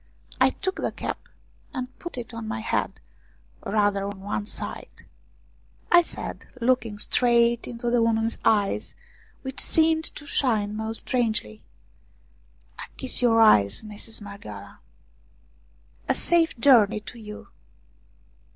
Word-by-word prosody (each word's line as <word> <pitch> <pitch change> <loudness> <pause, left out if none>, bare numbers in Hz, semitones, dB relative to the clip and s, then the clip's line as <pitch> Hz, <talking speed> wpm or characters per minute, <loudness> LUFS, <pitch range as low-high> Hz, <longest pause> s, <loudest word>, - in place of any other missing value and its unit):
I - - +6
took 380 0 -3
the - - -2
cap, - - -6 0.5
and 255 -1 -5
put 345 -6 -7
it 240 -1 -7
on 230 -1 -6
my 225 +1 -3
head, 220 - -2 0.6
rather 205 -2 +1
on 200 -1 -6
one 205 +1 -3
side. - - -6 0.9
I 350 - +8
said, 340 - -6
looking 235 -3 +1
straight 235 +1 +2
into 240 0 -3
the 240 -1 +3
woman's 225 0 +1
eyes, 205 -2 +1 0.5
which 265 -1 -3
seemed 320 0 +3
to 295 - -8
shine 215 -7 0
most 220 +1 0
strangely: 215 - -1 0.6
" - - -32
I - - -5
kiss 260 - 0
your 230 -2 +4
eyes, 105 - +5
Mistress 215 +1 -5
Marghioala! 200 0 -10 0.5
" - - -34
" - - -29
A - - +3
safe 335 -5 +2
journey 230 -4 +5
to 235 +2 -10
you." 210 -1 -10
225 Hz, 135 wpm, -25 LUFS, 205-250 Hz, 0.9 s, I